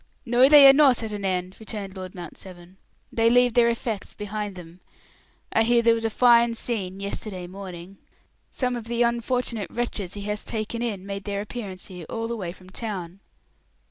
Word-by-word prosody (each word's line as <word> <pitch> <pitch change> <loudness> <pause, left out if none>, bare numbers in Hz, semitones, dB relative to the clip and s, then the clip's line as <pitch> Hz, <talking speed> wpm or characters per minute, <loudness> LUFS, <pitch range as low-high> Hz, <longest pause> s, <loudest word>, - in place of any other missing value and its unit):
"No, 250 +2 +5
they 290 -2 +10
are 270 - +9
not 275 -5 +5
at 220 - -4
an 205 -1 -5
end," 185 -1 -2
returned 205 -3 -6
Lord 185 0 -8
Mount 175 -3 -8
Severn; 180 0 -12 0.4
"they 230 0 +3
leave 245 0 +4
their 235 -1 +5
effects 230 -3 -4
behind 210 -1 -5
them. 175 0 -11 0.7
I 225 - +4
hear 235 +1 +3
there 230 0 +5
was 225 0 -2
a - - +2
fine 235 0 +4
scene 195 -6 -3
yesterday 200 -2 -5
morning; 185 0 -9 0.5
some 250 -2 -2
of 235 -2 -6
the 235 +1 +1
unfortunate 235 -3 -1
wretches 220 -6 -3
he 205 - -6
has 210 +1 -3
taken 225 +1 -4
in 205 -6 -3
made 200 0 -6
their 200 -1 -2
appearance 205 -4 -7
here, 180 -4 -10
all 225 0 -3
the 235 - -3
way 185 -6 -4
from 185 +1 -15
town." 190 -5 -5
210 Hz, 190 wpm, -25 LUFS, 190-235 Hz, 0.7 s, they